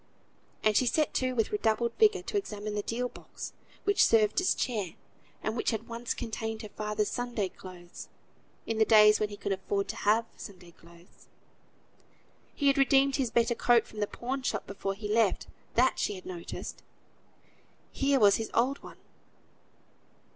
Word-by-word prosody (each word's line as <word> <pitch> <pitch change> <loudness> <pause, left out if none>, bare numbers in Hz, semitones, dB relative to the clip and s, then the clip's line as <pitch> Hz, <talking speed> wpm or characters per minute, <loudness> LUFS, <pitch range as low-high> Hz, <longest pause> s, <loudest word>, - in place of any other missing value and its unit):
And 215 -1 +3
she 255 - +3
set 300 +5 +1
to 255 0 0
with 225 -3 0
redoubled 235 - +1
vigour 415 -4 +4
to 390 - -6
examine 215 - -3
the 210 - -1
deal 240 +4 -2
box - - -9 0.3
which 405 0 +4
served 220 - +4
as 370 - +2
chair, 210 -9 -2 0.5
and 220 - -2
which 235 - 0
had 225 -1 -3
once 235 +1 -4
contained 225 -1 -4
her 215 - -7
father's 210 0 -2
Sunday 240 -5 -2
clothes, 180 -2 -11 0.6
in 225 -1 -2
the - - +7
days 210 -1 +6
when 215 - 0
he 205 - -8
could 200 - -4
afford 200 +1 -1
to - - -3
have 220 +3 +2
Sunday 180 -4 -11
clothes. 170 +2 -20 1.3
He 285 - -2
had 275 0 +4
redeemed 275 0 +4
his 265 -4 0
better 235 +1 +2
coat 235 -1 +3
from 215 - -11
the 205 - 0
pawn 260 +5 -4
shop 255 - -2
before 195 0 -4
he 210 +1 -6
left, 215 -2 +2 0.3
that 255 +3 +3
she 205 - -1
had 185 - -11
noticed. 175 -2 -7 1.1
Here 275 0 +2
was 205 -3 +6
his 225 - -4
old 260 +4 +1
one. - - -12
225 Hz, 170 wpm, -29 LUFS, 205-250 Hz, 1.3 s, the